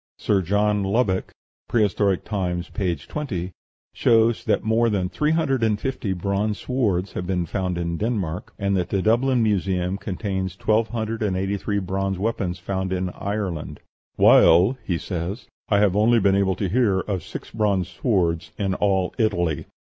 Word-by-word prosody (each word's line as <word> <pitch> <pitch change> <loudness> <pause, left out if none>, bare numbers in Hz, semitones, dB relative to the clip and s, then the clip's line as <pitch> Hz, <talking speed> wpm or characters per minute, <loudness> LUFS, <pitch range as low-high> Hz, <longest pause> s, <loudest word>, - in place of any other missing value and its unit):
Sir 100 -2 +1
John 105 +3 +1
Lubbock 95 -1 0 0.4
("Prehistoric 100 -4 +1
Times," 90 -4 -2
p. 90 -5 -1
20) 90 - -5 0.4
shows 115 0 +3
that - - +1
more 115 +1 +2
than 95 -4 0
three 150 +8 0
hundred 155 -6 +1
and 110 -2 +1
fifty 130 -6 -3
bronze 100 +3 -1
swords 100 -8 -1
have 90 - -4
been 90 -2 0
found 90 +1 -2
in 85 -1 -2
Denmark, 100 -6 -2
and 100 0 0
that 90 -2 -1
the 95 -2 0
Dublin 120 +2 +3
Museum 95 -2 0
contains 95 -2 -3
twelve 110 +3 +1
hundred 110 -1 -3
and 100 -4 0
eighty 95 +2 -1
three 100 +1 -2
bronze 95 0 -2
weapons 95 -3 -2
found 95 -1 -3
in 90 -1 -1
Ireland; 90 -9 -4 0.4
"while," 90 +10 +6
he 90 - -1
says, 90 +6 -4 0.2
"I 100 - +4
have 100 -2 +3
only 115 +3 +4
been 100 -1 +3
able 95 -1 +2
to 100 - -2
hear 100 -2 +2
of 95 -3 -3
six - - -9
bronze 100 -5 +1
swords 90 -5 0
in 95 -2 0
all 95 -1 +1
Italy." 85 -9 0
100 Hz, 165 wpm, -23 LUFS, 90-110 Hz, 0.4 s, while